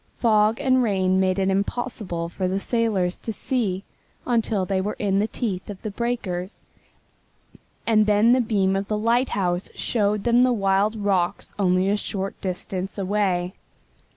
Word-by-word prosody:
Fog 215 0 +3
and 260 -2 +3
rain 190 -4 +2
made 185 0 +2
it 195 0 +1
impossible 200 -4 -2
for 185 +2 -3
the 190 +2 -1
sailors 205 -6 0
to 225 - -4
see 205 -4 -2 0.4
until 225 -5 +1
they 190 0 0
were 205 +2 -3
in 195 -1 +1
the 210 - +1
teeth 210 -5 -4
of 200 -2 -7
the 215 - -3
breakers, 200 -5 -3 1.2
and 215 -2 +3
then 210 +3 +5
the 255 - +4
beam 195 -4 +1
of 195 0 -2
the 210 - -1
lighthouse 210 -6 0
showed 210 -2 0
them 240 +1 +4
the 255 0 +4
wild 200 0 +1
rocks 195 -4 -1
only 185 -1 +2
a 200 - +2
short 195 -1 -4
distance 185 +1 -4
away. 190 -2 0
200 Hz, 155 wpm, -24 LUFS, 190-225 Hz, 1.2 s, then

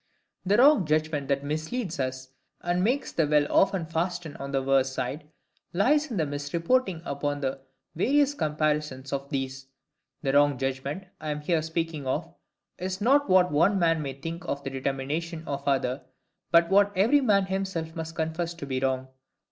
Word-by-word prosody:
The 205 +2 +4
wrong 265 - +6
judgment 155 -2 0
that 140 0 0
misleads 155 - -3
us, 130 0 -3 0.3
and 175 +1 0
makes 255 +7 0
the 160 -3 +1
will 150 0 +4
often 190 -3 +3
fasten 165 -1 -3
on 140 0 -6
the 135 -1 0
worse 135 0 +2
side, 140 +4 -4 0.4
lies 290 - +3
in 225 - -3
misreporting 165 - 0
upon 145 0 -2
the 135 0 -2 0.3
various 280 - +2
comparisons 150 - -1
of 140 0 -3
these. 135 -2 -4 0.6
The 135 -1 0
wrong 145 -1 +4
judgment 135 +6 -3 0.2
I 155 - -5
am 150 0 -3
here 160 +1 +1
speaking 160 -3 -3
of 160 +6 -2 0.5
is 185 +1 -3
not 280 +6 +3
what 185 -1 +5
one 170 +7 +3
man 165 -3 +2
may 135 -2 -4
think 165 +6 -6
of 140 0 -3
the 135 - -4
determination 140 +5 -3
of 140 -1 -3
another, 130 -1 +1 0.5
but 170 +1 +4
what 200 +1 +5
every 235 +10 +4
man 200 -6 +3
himself 190 -4 -3
must 165 0 -5
confess 165 +1 -2
to 165 - -7
be 130 -2 -2
wrong. 130 0 -1
155 Hz, 170 wpm, -27 LUFS, 140-180 Hz, 0.6 s, wrong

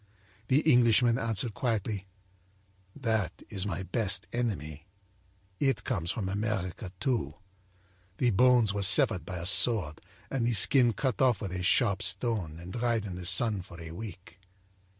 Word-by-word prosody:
âThe 140 +4 +2
Englishman 120 -3 +4
answered 115 -1 0
quietly: 105 -5 -3 0.9
â'That 110 -6 0 0.2
is 100 -1 -4
my 95 -1 -4
best 95 0 -1
enemy. 80 -10 -4 0.7
It 135 -2 0
comes 85 -10 -3
from 100 0 -3
America, 100 -2 -4
too. 105 - -2 0.8
The 125 -2 +1
bones 120 -1 +3
were 100 - -3
severed 95 -2 +5
by 90 - -5
a 85 - -6
sword 90 -5 +2 0.3
and 125 -3 -1
the 120 - +1
skin 120 +3 +5
cut 130 -1 -2
off 125 -4 +3
with 100 -4 -6
a 90 0 -4
sharp 100 +1 +1
stone 95 -4 -1
and 90 +2 -10
dried 115 -3 -1
in 95 -3 -6
the 90 -1 -4
sun 105 +1 +3
for 85 -1 -13
a 80 -1 -9
week.' 95 0 -10
105 Hz, 150 wpm, -28 LUFS, 90-120 Hz, 0.9 s, severed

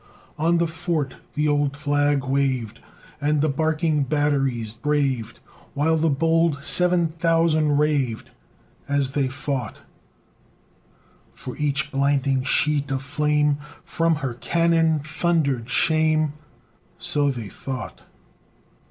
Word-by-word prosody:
On 165 +2 +2
the 170 - +2
fort 165 -4 -3 0.2
the 150 0 +1
old 145 -1 +1
flag 145 -1 +1
waved, 130 -4 -1 0.4
And 150 +1 +1
the 155 - +2
barking 155 +1 0
batteries 135 -6 0
braved, 135 -3 -1 0.4
While 155 +3 +2
the 160 0 +2
bold 165 0 +1
seven 180 +1 +3
thousand 160 -2 +2
raved 145 -6 0 0.6
As 140 -2 +1
they 140 -1 0
fought; 130 0 -4 1.5
For 125 - -8
each 140 -2 -1
blinding 140 -1 +1
sheet 145 +2 +1
of 135 0 -2
flame 150 0 +1 0.2
From 165 -1 +1
her 125 - -2
cannon 165 +3 +1
thundered 150 -6 0
shame! 155 +2 +2 0.6
So 145 -1 +1
they 120 -6 -4
thought. 130 -3 -7
145 Hz, 110 wpm, -23 LUFS, 135-160 Hz, 1.5 s, seven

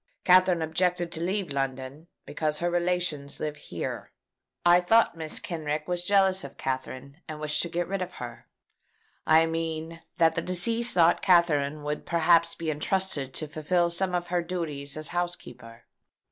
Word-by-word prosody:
Katherine 180 -2 +5
objected 175 +2 0
to 165 - -4
leave 185 -3 -1
London, 135 +3 -4 0.2
because 150 0 -2
her 175 0 -1
relations 175 -5 -1
live 150 -1 -3
here. - - -6 0.5
I 175 +1 +6
thought 225 +2 +3
Mrs. 160 -2 -3
Kenrick 155 -3 -3
was 175 -1 -1
jealous 190 -1 +3
of 140 - -10
Katherine, 135 +3 -5
and 155 -2 -7
wished 150 0 0
to 170 - -4
get 175 +1 -2
rid 195 0 -3
of 180 0 -5
her. 120 -1 -9 0.8
I 160 +1 +6
mean 165 0 -4 0.2
that 165 -1 +2
deceased 230 +6 +2
thought 170 -1 +5
that - - -18
Katherine 155 -5 +2
would 150 0 -4
perhaps 170 0 +3
be 165 -2 -3
entrusted 155 -3 -1
to 155 - -3
fulfil 170 +3 0
some 180 +1 0
of 175 0 -3
her 175 0 +1
duties 155 -5 -4
as 155 0 -2
housekeeper. 125 -10 -5
165 Hz, 160 wpm, -27 LUFS, 150-180 Hz, 0.8 s, I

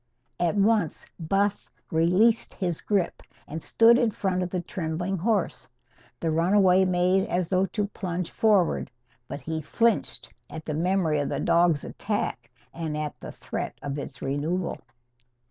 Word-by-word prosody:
At 175 +2 +1
once 205 -4 +2
Buff 195 +5 0 0.2
released 180 +8 +3
his 175 -5 -2
grip 200 -5 0 0.3
and 160 +2 -6
stood 230 +6 +5
in 240 -3 +3
front 190 -3 -1
of 180 - -2
the 180 - -2
trembling 175 +2 -3
horse. 205 0 -1 0.5
The 165 - -1
runaway 185 +3 +4
made 185 +1 +2
as 175 -1 0
though 190 0 +2
to 210 0 -1
plunge 180 -4 -4
forward. 205 -6 +2 0.4
But 140 - -6
he 160 +3 -3
flinched 230 +8 0 0.2
at 160 - -8
the 155 - -3
memory 165 -1 +1
of 145 - -1
the 140 - -2
dog's 170 -1 +3
attack 200 - -3 0.2
and 160 -2 -4
at 150 -1 -3
the - - -8
threat - - -5
of 145 0 -3
its 140 -1 -8
renewal. 150 +6 -2
180 Hz, 150 wpm, -26 LUFS, 160-195 Hz, 0.5 s, stood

